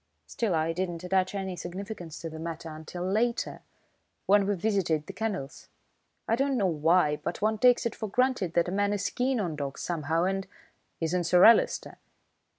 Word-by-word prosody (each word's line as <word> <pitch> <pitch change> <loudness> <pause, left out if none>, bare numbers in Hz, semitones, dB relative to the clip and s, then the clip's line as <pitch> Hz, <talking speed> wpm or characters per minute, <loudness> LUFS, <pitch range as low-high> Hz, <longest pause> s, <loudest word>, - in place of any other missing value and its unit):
Still, 215 -7 -1
I 160 +1 0
didn't 175 -1 -3
attach 185 +1 0
any 190 -2 -3
significance 180 -1 -7
to 165 - -5
the 160 - -8
matter 165 0 -6
until 160 +3 -7
later, 230 +5 0 0.6
when 200 0 +4
we 205 - +1
visited 180 -6 0
the - - -8
kennels. 190 -11 -4 0.6
I 225 - +3
don't 270 +1 +1
know 205 - +1
why, 160 -2 +3
but 175 - -5
one 215 0 +1
takes 245 0 +5
it 235 - -1
for 215 - -5
granted 250 -6 +1
that 170 0 +3
a - - -3
man 205 +1 +1
is 200 -1 -2
keen 255 0 0
on 175 -7 -2
dogs 140 -2 -5
somehow 165 -1 -1
and 195 +1 -1 0.3
" - - -45
"Isn't 175 +2 0
Sir 180 +1 +6
Alister?" 230 - +4
185 Hz, 185 wpm, -28 LUFS, 165-205 Hz, 0.6 s, Sir